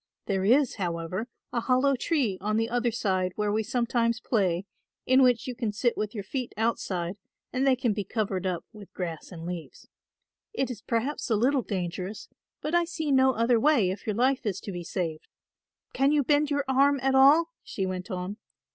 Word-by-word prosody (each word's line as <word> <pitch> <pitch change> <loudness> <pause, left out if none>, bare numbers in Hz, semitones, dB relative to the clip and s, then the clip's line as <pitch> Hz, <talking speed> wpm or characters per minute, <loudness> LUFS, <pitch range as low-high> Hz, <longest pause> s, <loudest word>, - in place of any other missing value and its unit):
There 190 -1 0
is, 255 +5 +3
however, 175 +3 -3 0.3
a 240 - +1
hollow 260 +3 +2
tree 250 - 0
on 215 +2 0
the 225 +1 0
other 245 0 +1
side 185 -5 0
where 210 -1 0
we 215 +1 +1
sometimes 235 0 0
play, 190 -7 0 0.4
in 260 +1 +5
which 250 -1 +4
you 255 - -3
can 235 -3 -2
sit 235 +3 0
with 210 +1 -3
your 205 - -4
feet 250 +5 -4
outside 195 -5 -1 0.4
and 260 +2 +1
they 265 - +5
can 240 -3 0
be 205 0 -2
covered 195 -2 -2
up 180 -2 -3
with 210 -3 -12
grass 170 -2 -5
and 165 -2 -8
leaves. 175 -2 -7 0.7
It 270 - -1
is 220 -4 -8
perhaps 245 +7 -2
a 225 - +3
little 260 +5 +2
dangerous 185 0 -4 0.3
but 305 - -3
I 345 0 +4
see 320 -3 -3
no 265 -1 +5
other 230 0 +3
way 235 -9 +3
if 195 +3 -8
your 210 - 0
life 255 +3 +2
is 200 -4 -2
to 200 - -6
be 175 -2 -5
saved. 165 -2 -4 0.7
Can 275 +2 +3
you 295 -1 +3
bend 295 +2 +2
your 285 -1 0
arm 275 +1 +4
at 270 0 +2
all?" 290 +5 +6
she 195 - -3
went 185 -1 -4
on. 185 +3 -4
225 Hz, 200 wpm, -27 LUFS, 190-265 Hz, 0.7 s, all